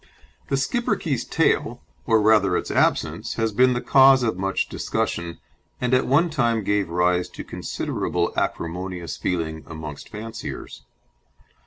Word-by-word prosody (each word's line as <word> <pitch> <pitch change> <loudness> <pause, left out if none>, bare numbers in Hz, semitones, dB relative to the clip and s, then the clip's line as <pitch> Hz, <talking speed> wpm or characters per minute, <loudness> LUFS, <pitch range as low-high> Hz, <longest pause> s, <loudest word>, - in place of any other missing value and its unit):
The 135 - +1
Schipperke's 150 - -1
tail, 125 -6 0 0.2
or 110 -3 +4
rather 105 -4 +4
its - - -4
absence, - - 0
has 115 -1 0
been 125 +4 +4
the 120 - -2
cause 135 -1 +6
of 110 -5 0
much 95 +1 -1
discussion, 85 -1 -3 0.4
and 125 0 0
at 125 - +3
one 160 +6 +3
time 120 -7 +1
gave 105 -3 0
rise 90 +1 +1
to - - -8
considerable - - -2
acrimonious 90 +1 -3
feeling 80 -3 -3
amongst 80 -3 -8
fanciers. 110 +2 -7
110 Hz, 135 wpm, -23 LUFS, 90-125 Hz, 0.4 s, cause